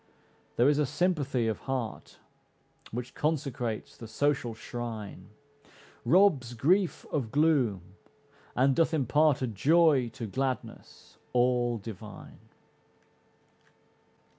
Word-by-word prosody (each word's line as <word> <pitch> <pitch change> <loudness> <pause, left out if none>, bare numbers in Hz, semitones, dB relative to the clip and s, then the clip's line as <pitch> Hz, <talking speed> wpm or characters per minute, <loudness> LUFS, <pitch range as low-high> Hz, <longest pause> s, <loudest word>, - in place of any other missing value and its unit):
There 120 - +4
is 145 0 +3
a 150 - +2
sympathy 145 -6 0
of 110 - -2
heart 125 -5 -4 0.7
Which 120 +2 -6
consecrates 130 -7 -2
the 115 - -10
social 125 0 0
shrine, 110 -5 -7 0.8
Robs 155 -10 +3
grief 180 - +1
of 130 -7 -1
gloom 140 - +2 0.7
and 135 +1 +3
doth 165 -1 +2
impart 145 0 +2
A - - 0
joy 140 - +3
to 125 -4 -5
gladness 130 +4 -5
all 120 -1 +2
divine. 105 -1 -10
130 Hz, 100 wpm, -29 LUFS, 115-150 Hz, 0.8 s, There